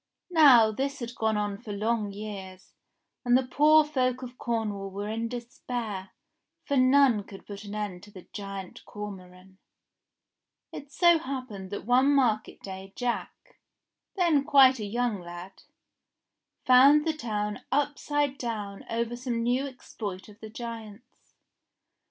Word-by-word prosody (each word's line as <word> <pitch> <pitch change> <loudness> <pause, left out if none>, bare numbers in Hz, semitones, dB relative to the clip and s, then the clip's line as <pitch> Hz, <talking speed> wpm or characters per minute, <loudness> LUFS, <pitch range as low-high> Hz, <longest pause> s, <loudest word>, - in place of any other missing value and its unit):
Now 265 -10 +7
this 275 +5 -3
had 235 -1 -6
gone 220 -2 0
on 205 -1 -2
for 225 -4 -8
long 210 0 -1
years, 195 -2 -9 0.5
and 245 0 +4
the 260 - -1
poor 305 +4 +5
folk 260 -3 -1
of 250 0 -8
Cornwall 210 -4 -2
were 200 +2 -5
in 225 +1 -2
despair, 235 -4 -5 0.6
for 280 - -1
none 255 -4 +4
could 195 -1 -13
put 205 0 -8
an 205 +1 -7
end 205 -4 -4
to 205 - -14
the 185 -3 -13
Giant 195 -2 -7
Cormoran. 190 -2 -10 1.1
It 285 0 -9
so 345 +2 +5
happened 255 - -6
that 205 - -6
one 260 +4 +4
market 225 -6 +1
day 190 0 -9
Jack, 245 - -4 0.6
then 335 -7 +3
quite 270 -3 +6
a 210 - -3
young 235 0 -1
lad, 175 +2 -10 1.0
found 275 +4 +7
the 320 - +1
town 210 -7 -3
upside 290 0 0
down 210 -5 -5
over 235 +1 -2
some 240 -2 -3
new 250 +4 +1
ex 260 -2 -14
ploit 195 -4 -5
of 210 0 -16
the 220 - -9
giant's. 230 0 -10
230 Hz, 145 wpm, -28 LUFS, 205-260 Hz, 1.1 s, Now